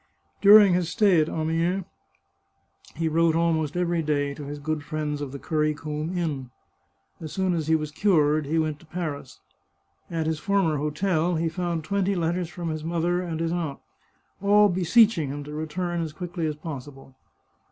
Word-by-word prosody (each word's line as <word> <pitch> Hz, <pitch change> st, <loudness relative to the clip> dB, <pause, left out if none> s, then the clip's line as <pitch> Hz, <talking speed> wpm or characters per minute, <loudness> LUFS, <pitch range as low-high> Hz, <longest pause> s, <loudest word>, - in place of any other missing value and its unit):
During 205 Hz, -1 st, +8 dB
his 175 Hz, -2 st, 0 dB
stay 195 Hz, -5 st, +4 dB
at 155 Hz, -, -1 dB
Amiens 165 Hz, +4 st, -1 dB, 1.1 s
he 165 Hz, +1 st, -1 dB
wrote 165 Hz, +1 st, +2 dB
almost 165 Hz, -2 st, 0 dB
every 175 Hz, -1 st, +1 dB
day 145 Hz, -2 st, 0 dB
to 145 Hz, 0 st, -8 dB
his 145 Hz, +1 st, -6 dB
good 150 Hz, +1 st, -3 dB
friends 150 Hz, -1 st, -3 dB
of 140 Hz, -2 st, -4 dB
the 140 Hz, -, -6 dB
Currycomb 155 Hz, +2 st, -2 dB
Inn. 145 Hz, -7 st, -3 dB, 0.7 s
As 155 Hz, -2 st, -7 dB
soon 190 Hz, -1 st, 0 dB
as 160 Hz, -3 st, -2 dB
he 160 Hz, -, +4 dB
was 155 Hz, -1 st, -2 dB
cured 155 Hz, -5 st, +2 dB
he 160 Hz, +3 st, 0 dB
went 155 Hz, -2 st, -1 dB
to 165 Hz, -, -19 dB
Paris. 155 Hz, -6 st, -5 dB, 0.7 s
At 165 Hz, -2 st, -2 dB
his 160 Hz, -1 st, -1 dB
former 195 Hz, -6 st, +1 dB
hotel 160 Hz, +3 st, 0 dB
he 165 Hz, +1 st, 0 dB
found 170 Hz, -1 st, -3 dB
twenty 200 Hz, +3 st, 0 dB
let 170 Hz, -1 st, 0 dB
ters 175 Hz, -2 st, -3 dB
from 175 Hz, -1 st, -5 dB
his 155 Hz, -1 st, -4 dB
mother 170 Hz, +2 st, 0 dB
and 165 Hz, -3 st, -4 dB
his 165 Hz, 0 st, -1 dB
aunt, 165 Hz, -5 st, -2 dB, 0.6 s
all 205 Hz, +1 st, +5 dB
beseeching 180 Hz, -, +3 dB
him 145 Hz, +1 st, -5 dB
to 150 Hz, +1 st, -9 dB
re 155 Hz, +1 st, -4 dB
turn 175 Hz, +1 st, -2 dB
as 160 Hz, -2 st, -4 dB
quickly 170 Hz, 0 st, -4 dB
as 150 Hz, -, -2 dB
possible. 140 Hz, -3 st, -9 dB
160 Hz, 180 wpm, -25 LUFS, 150-175 Hz, 1.1 s, During